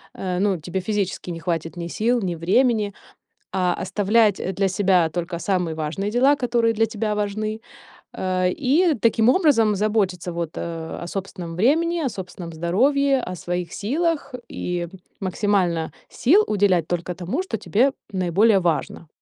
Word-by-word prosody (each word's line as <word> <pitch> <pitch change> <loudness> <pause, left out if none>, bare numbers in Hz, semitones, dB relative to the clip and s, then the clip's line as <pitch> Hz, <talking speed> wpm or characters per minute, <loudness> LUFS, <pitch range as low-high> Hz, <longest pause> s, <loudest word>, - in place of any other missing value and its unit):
э, 180 -1 -3
ну 195 -1 +2
тебе 175 +4 -3
физически 195 -2 -2
не 165 - -5
хватит 165 -1 -2
ни 170 -1 -4
сил, 235 +6 0
ни 180 -3 -2
времени. 210 +5 +2 0.6
А 180 -2 +1
оставлять 205 +2 +2 0.2
для 195 -1 +2
себя 185 -3 +2
только 170 +1 -3
самые 180 -3 -1
важные 160 +6 -2
дела, 260 +5 +4
которые 235 -3 +1
для 225 +1 +2
тебя 215 0 -2
важны, 215 +1 -2 0.5
э, 185 -1 0
и 305 - +2
таким 225 0 +4
образом 250 - +4
заботиться 195 -4 0
вот, 170 -2 -3
а, 165 -1 -5
о - - -6
собственном 185 -3 -6
времени, 330 - +2
о 280 - 0
собственном 180 -4 -8
здоровье, 265 - +2
о 185 -5 -5
своих 175 0 -4
силах, 305 - -1 0.2
и 175 -1 -3 0.3
максимально 185 -4 0 0.2
сил 375 - +4
уделять 190 -5 +2
только 175 +1 -2
тому, 185 - -2
что 300 -12 -3
тебе 245 +7 +2 0.2
наиболее 190 +3 +3
важно. 170 -1 -2
195 Hz, 150 wpm, -23 LUFS, 175-230 Hz, 0.6 s, дела